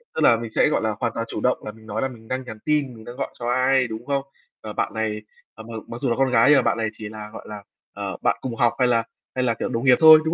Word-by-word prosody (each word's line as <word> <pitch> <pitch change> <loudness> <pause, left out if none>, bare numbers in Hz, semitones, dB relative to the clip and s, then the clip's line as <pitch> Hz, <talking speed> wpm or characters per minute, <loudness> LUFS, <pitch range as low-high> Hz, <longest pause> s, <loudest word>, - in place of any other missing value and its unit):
tức - - -1
là 115 - +7
mình 115 -1 -6
sẽ, - - +3
gọi - - +1
là, 110 -1 0
hoàn 120 -2 0
toàn 115 - -2
chủ - - -4
động 125 - +1
là 105 - -4
mình 110 +1 -17
nói 110 0 -3
là 135 - +1
mình 115 -4 -13
đang 130 +2 -2
nhắn 110 -4 -8
tin, 150 -4 +1
mình 110 - -12
đang 120 - -8
gọi - - -3
cho 120 - -4
ai, 130 +1 +3
đúng 110 +1 -7
không? 140 -1 0 0.4
Ờ, 110 -1 -7
bạn - - -1
này, 110 -1 -2 0.3
ờ, 110 - -10
m - - -14 0.2
mặc 115 - -6
dù 135 - +1
là 115 - +1
con 135 0 +2
gái 115 +2 +5
nhưng 145 - +7
mà - - +5
bạn - - +1
này 110 -1 0
chỉ 110 -1 -8
là, 105 0 -8
gọi - - -9
là, 105 -1 -7 0.3
ờ, - - -5
bạn - - +2
cùng 125 -3 -4
học 120 +1 +3
hay 125 - +4
là 115 -2 +3 0.3
hay 130 - +1
là, 120 -2 +2
kiểu, 115 - -3
đồng 115 +3 -2
nghiệp 130 -1 +7
thôi, 160 -1 +10
đúng 160 - +1
120 Hz, 325 wpm, -23 LUFS, 110-130 Hz, 0.4 s, thôi